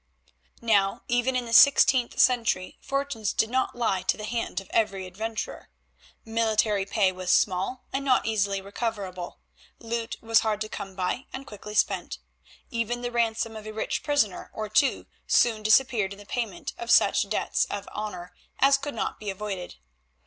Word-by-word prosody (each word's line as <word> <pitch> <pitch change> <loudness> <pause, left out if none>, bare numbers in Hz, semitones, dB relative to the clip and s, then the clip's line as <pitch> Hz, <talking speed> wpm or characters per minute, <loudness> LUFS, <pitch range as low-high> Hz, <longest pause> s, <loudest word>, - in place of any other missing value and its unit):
Now 200 -4 +2
even 245 +2 +1
in 250 -1 0
the 230 - -6
sixteenth 260 -1 +6
century 230 -7 +2
fortunes 275 -7 -2
did 220 - +1
not 260 +1 0
lie 220 -6 0
to 185 - 0
the 215 - -7
hand 230 -1 -2
of 195 - -12
every 195 -4 0
adventurer. 220 +5 -5 0.6
Military 220 -3 +1
pay 195 -2 +2
was 185 -1 -6
small, 190 +6 +1
and 270 +1 -1
not 260 -2 +3
easily 200 -3 0
recoverable; 200 -3 -5 0.4
loot 230 0 -4
was 225 0 +3
hard 215 -2 -1
to 215 - -3
come 195 -2 -7
by, 185 +8 -2
and 265 +1 -7
quickly 210 -2 -9
spent. - - 0 0.5
Even 235 +1 -2
the 245 - -2
ransom 230 -1 0
of 215 0 -8
a 215 - -6
rich 220 - -2
prisoner 255 -11 0
or 215 -1 -4
two 265 +6 +2 0.2
soon 225 -3 +3
disappeared 215 -2 +3
in - - -12
the 205 - -13
payment 220 -5 -4
of 235 - -6
such - - +4
debts - - 0
of 205 0 -6
honour 185 -4 -6 0.2
as 275 0 +5
could 285 -2 -5
not - - -3
be 210 - -5
avoided. 195 -2 -5
220 Hz, 170 wpm, -26 LUFS, 200-240 Hz, 0.6 s, sixteenth